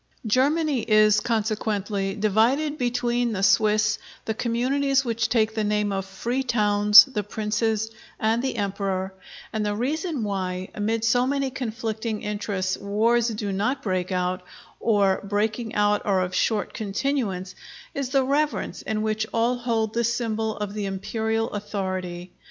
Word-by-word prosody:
Germany 280 +5 +2
is, 215 -1 +4
consequently, 210 -3 -1
divided 235 +9 +1
between 245 -1 0
the 195 -1 -2
Swiss, 210 +2 +3 0.3
the 220 - -1
communities 265 +4 +1
which 230 -1 0
take 220 -2 +2
the 220 - -1
name 210 0 0
of 195 -1 -3
Free 235 +7 -2
Towns, 210 -4 +6
the 260 -6 -3
Princes, 220 +1 -1 0.3
and 225 +2 +1
the 265 -1 -2
Emperor; 195 -2 -2 0.4
and 220 -1 -1
the 205 0 -1
reason 295 - -2
why, 185 -2 -3
amid 220 +2 -1
so 245 +2 +3
many 275 -1 0
conflicting 225 -3 -4
interests, 205 -2 -2
wars 225 +4 +2
do 210 -3 -3
not 255 +8 -1
break 185 -2 -1
out, 180 0 -1 0.4
or 200 -4 +2
breaking 215 +3 -1
out 210 0 +2
are 195 -2 +2
of 180 0 -2
short 210 +2 0
continuance, 200 -4 -2 0.4
is 275 -2 -3
the 270 0 +3
reverence 290 +3 -1
in 215 -1 -2
which 215 0 -1
all 235 +2 +1
hold 225 -3 -1
this 235 0 +1
symbol 220 -2 -2
of 210 -1 -4
the 210 -1 -3
Imperial 220 +4 -2
authority. 185 -3 -4
215 Hz, 145 wpm, -24 LUFS, 205-240 Hz, 0.4 s, Towns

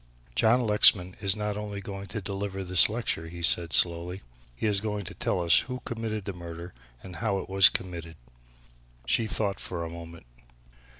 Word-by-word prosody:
John 120 - +3
Lexman 95 -4 +5
is 100 -1 +2
not 105 -1 -3
only 105 -1 -5
going 100 0 -8
to 105 +3 -5
deliver 95 0 -4
this 90 +1 +5
lecture," 110 -7 -3
he 85 0 -9
said 85 0 +3
slowly, 85 +1 +3
"but - - -26 0.3
he - - -4
is 100 -2 +1
going 105 -2 -4
to 95 - -7
tell 95 - -1
us 85 -1 +5
who 125 0 -5
committed 110 -3 -4
the 100 - -4
murder 85 0 -9 0.3
and 90 -2 -10
how 110 -4 -1
it - - -6
was 95 0 +6
committed." 85 -3 -6 0.9
She 110 - +2
thought 100 -2 -2
a 85 -2 -4
moment. 85 -1 -11
95 Hz, 180 wpm, -27 LUFS, 85-105 Hz, 0.9 s, was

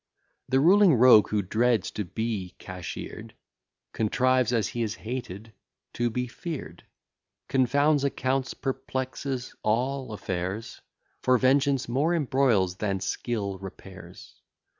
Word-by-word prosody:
The 130 +1 +3
ruling 185 +2 +6
rogue, 120 -3 +7
who 105 -1 0
dreads 110 0 +1
to 105 - -3
be 100 0 -4
cashler'd, 90 -2 -8 0.6
Contrives, 125 +2 +2
as 115 -3 +1
he 120 - -4
is 110 -1 -2
hated, 110 -3 -7 0.4
to 120 0 0
be 125 +2 -2
fear'd; 125 - -7 0.6
Confounds 140 +3 +2
accounts, 135 -1 -1
perplexes 130 -1 -4
all 130 +4 -1
affairs: 95 +1 -4 0.4
For 130 0 +4
vengeance 135 +1 +2
more 145 +8 +1
embroils, 125 - +2
than 100 -2 -1
skill 100 -1 -3
repairs. 95 -2 -11
120 Hz, 115 wpm, -27 LUFS, 100-130 Hz, 0.6 s, rogue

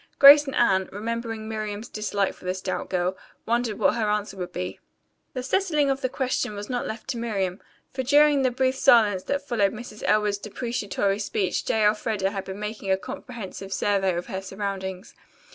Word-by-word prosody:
Grace 290 +1 +9
and 270 - -3
Anne, 190 -5 +3
remembering 225 +1 -4
Miriam's 215 0 -4
dislike 205 -3 -1
for - - -19
the 185 0 -1
stout 185 0 -4
girl, 180 0 0 0.3
wondered 235 -2 0
what - - +3
her 220 -3 0
answer 210 -1 -1
would 180 -2 -5
be. 90 +1 -5 0.6
The 255 - -3
settling 300 -2 +1
of 270 0 -2
the 255 - 0
question 255 -5 -1
was 205 +4 -6
not 245 - -2
left 220 0 -6
to 245 -3 -2
Miriam, 195 -5 -2 0.3
for 265 - -2
during 290 +2 +5
the 260 - +3
brief 260 +1 +1
silence 215 -7 +5
that 280 0 -2
followed 205 -5 +2
Mrs. 220 -1 -9
Elwood's 210 -1 +2
deprecatory 205 -2 -2
speech 195 -3 -1
J. 220 -1 +2
Elfreda 210 -2 +1
had 195 -2 -4
been 190 +1 -7
making 210 -1 -5
a 190 - +4
comprehensive 200 -4 -8
survey 195 -2 +1
of 175 +1 -3
her 190 - -4
surroundings. 195 -1 -5
210 Hz, 185 wpm, -25 LUFS, 195-245 Hz, 0.6 s, Grace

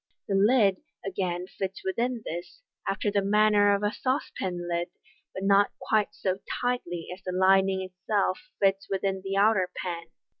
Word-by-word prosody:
The 200 - -1
lid 200 -1 +4 0.3
again 180 -2 -2
fits 190 0 -5
within 235 +4 -1
this 175 - -7 0.2
after 195 +1 0
the 200 0 +2
manner 205 0 +4
of 200 - -3
a 205 - +2
saucepan 190 - -2
lid, 170 0 -1 0.4
but 190 - -6
not 200 +1 +5
quite 215 -1 0
so 190 0 -1 0.2
tightly 210 -9 -2
as 185 - -12
the 185 - -4
lining 190 +1 +3
itself 185 +1 -1 0.2
fits 195 0 +2
within 195 0 -1
the 195 0 -2
outer 200 -3 +4
pan. 170 -2 -4
195 Hz, 155 wpm, -27 LUFS, 185-205 Hz, 0.4 s, not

